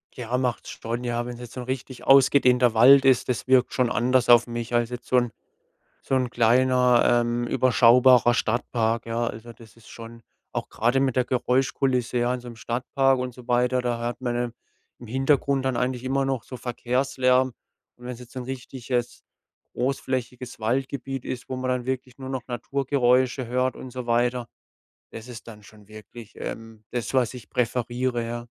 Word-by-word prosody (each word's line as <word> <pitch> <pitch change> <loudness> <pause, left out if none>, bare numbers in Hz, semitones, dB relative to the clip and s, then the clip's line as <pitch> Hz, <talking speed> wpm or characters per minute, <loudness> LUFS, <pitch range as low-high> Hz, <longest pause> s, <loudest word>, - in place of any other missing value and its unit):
Ja, 125 0 -2
macht's 125 -2 -2
schon, 115 +2 -5
ja. 120 -1 -2
Wenn's 120 0 -7
jetzt 120 -2 -10
so - - -7
'n - - -6
richtig 130 0 -6
ausgedehnter 125 -3 +5
Wald 135 +4 +7
ist, 130 -2 +3
das 125 -1 -2
wirkt 130 -1 +3
schon 125 -2 +1
anders 125 0 +1
auf 120 0 +6
mich, 120 0 -5
als 120 -1 +1
jetzt 125 0 -8
so 130 - +2
'n 120 -2 +1 0.7
so - - -2
'n 130 -2 0
kleiner, 125 0 +3
ähm, 120 0 -2
überschaubarer 125 0 +5
Stadtpark, 115 0 -1
ja. 115 +1 -1
Also, 115 +1 -7
das 115 -1 -17
ist 115 - -18
schon 115 0 -11 0.3
auch - - -4
grade 120 +4 +1
mit 135 -2 0
der 125 - +3
Geräuschkulisse, 125 0 0
ja, 120 +1 +1
in 125 - -5
so 120 - -10
'nem 120 - -10
Stadtpark 130 +3 0
und 125 -1 -4
so 125 0 -14
weiter, 125 +1 +2
da 120 -1 -1
hört 120 +1 -4
man 125 -2 -2
dann 120 0 -2 0.5
im 120 - -11
Hintergrund 135 +2 +1
dann 130 -2 0
eigentlich 125 0 -2
immer 135 +1 0
noch 135 -3 -2
so 130 - -8
Verkehrslärm. 125 +1 +1 0.5
Und 125 - -16
wenn's 125 -1 -7
jetzt 125 -1 -13
so 130 - -7
'n - - -6
richtiges, 125 -1 -4 0.5
großflächiges 125 -1 -3
Waldgebiet 135 +3 -2
ist, 125 -1 -6
wo 130 - -4
man 130 0 -2
dann 125 -1 -1
wirklich 130 0 -4
nur 130 -1 -7
noch 130 -2 -3
Naturgeräusche 130 0 0
hört 125 +2 0
und 130 - -9
so 125 0 -7
weiter, 120 +1 +1 0.6
das 115 0 -9
ist 120 -1 -10
dann 105 -2 -12
schon 105 0 -18
wirklich, 110 +1 -12
ähm, 115 -1 -8
das, 120 -3 -4
was 130 -2 +1
ich 120 -6 -11
präferiere, 120 0 -1
ja. 120 0 -6
125 Hz, 185 wpm, -24 LUFS, 120-130 Hz, 0.7 s, Wald